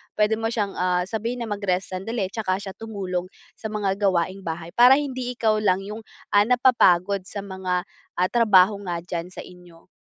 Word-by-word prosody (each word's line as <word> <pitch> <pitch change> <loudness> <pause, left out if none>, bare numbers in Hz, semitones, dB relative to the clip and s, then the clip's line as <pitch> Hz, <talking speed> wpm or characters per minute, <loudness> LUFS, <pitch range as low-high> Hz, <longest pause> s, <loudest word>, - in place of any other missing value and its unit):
puwede 215 +1 +2
mo 225 - -1
siyang, 210 -4 -1
ah, 180 0 +1
sabihin 230 +5 -3
na 225 - -6
mag-rest 195 -2 -2
sandali 195 +1 -3
tsaka 200 -4 -1
siya 195 -1 -6
tumulong 190 -5 -4 0.3
sa 220 - -4
mga 210 -1 -4 0.2
gawaing 185 0 0
bahay, 165 0 -4
para 245 +2 +8
hindi 255 -3 -4
ikaw 220 -3 +1
lang 195 -3 +2
'yong, 210 +3 -8 0.3
ah, 205 - +7
napapagod 200 -7 +3
sa 200 - -7
mga, 190 -2 -2 0.4
ah, 180 - +3
trabaho 210 -4 +5
nga 175 -2 -3
diyan 175 +1 -5
sa - - -9
inyo. 175 -2 -16
195 Hz, 180 wpm, -24 LUFS, 180-220 Hz, 0.4 s, para